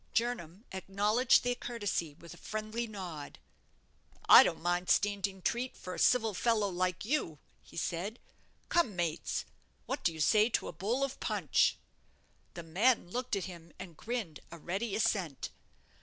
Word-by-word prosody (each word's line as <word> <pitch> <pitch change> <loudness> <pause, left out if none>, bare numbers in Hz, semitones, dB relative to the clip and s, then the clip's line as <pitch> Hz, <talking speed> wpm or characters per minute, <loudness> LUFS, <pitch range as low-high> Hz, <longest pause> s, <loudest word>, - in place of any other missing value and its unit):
Jernam 225 -4 -1
acknowledged 205 +6 +2
their 245 0 +1
courtesy 205 -11 -3
with 170 +1 -12
a - - -13
friendly 215 +2 -4
nod. 180 -9 -7 0.9
"I - - +11
don't - - +1
mind 175 +1 -1
standing 200 -2 +1
treat 250 +2 -1
for 185 - -7
a - - -6
civil 225 -4 +3
fellow 215 0 +1
like 180 +1 -1
you," 220 - -1 0.2
he - - -15
said; 175 +6 -2 0.5
"come, 335 - +2
mates, 170 -3 -2 0.4
what - - -3
do - - +3
you 160 - -9
say 215 +8 +4
to - - -1
a - - -6
bowl 215 - -1
of 275 -1 -3
punch?" - - +2 0.8
The 170 - -6
men 190 +5 +2
looked 250 0 -1
at 195 - -2
him 170 -3 -10
and 185 -3 -9
grinned 220 -6 -4
a 170 - -8
ready 195 +6 -3
assent. 185 -9 -1
200 Hz, 155 wpm, -32 LUFS, 175-230 Hz, 0.9 s, I